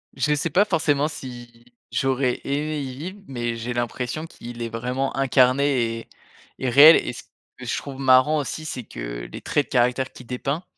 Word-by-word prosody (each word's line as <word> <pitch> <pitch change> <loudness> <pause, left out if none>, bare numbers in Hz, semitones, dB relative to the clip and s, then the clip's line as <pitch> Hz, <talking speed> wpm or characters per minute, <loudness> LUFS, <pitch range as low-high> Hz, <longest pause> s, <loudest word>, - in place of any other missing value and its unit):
Je 150 -1 +1
sais 150 +3 -1
pas 190 +7 +4
forcément 155 -6 +1
si 120 -6 -10 0.3
j'aurais 130 -1 0
aimé 150 +2 -2
y 130 -2 -6
vivre, 185 +7 -7
mais 120 -3 -3
j'ai 115 +2 -5
l'impression 120 +5 -3
qu'il 120 -5 -10
est 115 - -2
vraiment 125 +4 -2
incarné 130 -3 +2
et - - -12 0.5
et 130 - -1
réel. 145 +6 +9
Et - - -3
ce - - -9 0.3
que - - -9
je - - -1
trouve 135 -2 -7
marrant 130 +3 +5
aussi, 155 +2 -5
c'est 130 -5 -5
que, - - -7
les - - -8
traits 145 - 0
de - - -33
caractère 125 +1 +1
qu'il 125 - -13
dépeint, 135 +7 -3
130 Hz, 190 wpm, -23 LUFS, 120-145 Hz, 0.5 s, réel